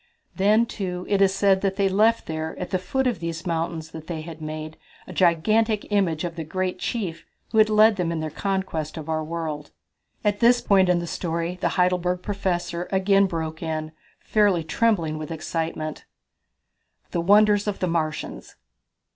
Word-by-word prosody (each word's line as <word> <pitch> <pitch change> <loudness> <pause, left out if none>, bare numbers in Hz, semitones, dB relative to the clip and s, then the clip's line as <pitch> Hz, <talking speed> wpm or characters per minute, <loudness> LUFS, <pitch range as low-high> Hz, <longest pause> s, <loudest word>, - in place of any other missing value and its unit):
"Then, 210 +4 +4
too, 185 -5 -4
it 200 -1 +2
is 195 -1 +5
said 195 -1 +3
they 195 0 +1
left 215 +4 +3
there 160 0 -4
at 180 - -5
the 185 - +1
foot 265 +9 -1
of 240 -8 0
these 165 +1 -5
mountains 165 -1 -2
that 160 -1 -9
they 165 -3 -4
had 160 0 -9
made 155 0 -6 0.3
a - - -9
gigantic 210 +5 +2
image 185 -6 +1
of 170 -1 -4
the 165 - -4
great 185 +3 -3
chief 190 -8 -3 0.3
who 220 - +3
led 215 0 +4
them 175 -2 0
in 165 - -2
their 155 -1 -3
conquest 190 -6 -2
of 155 -1 -6
our 155 0 0
world." 155 -2 -4 0.6
At 205 0 +1
this 240 +1 +5
point 195 -5 +3
in 180 - +4
the 170 - -2
story 170 +1 -3
the 170 - +2
Heidelberg 180 0 +1
Professor 180 -3 -2
again 195 +1 +4
broke 160 -3 -4
in, 155 -1 -3 0.3
fairly 205 -6 +2
trembling 165 -4 +1
with 155 - -6
excitement: 160 -1 -4 1.1
The 170 - 0
Wonders 205 +3 +4
of 205 - -1
the - - -1
Martians! 155 - -3
180 Hz, 170 wpm, -24 LUFS, 160-200 Hz, 1.1 s, is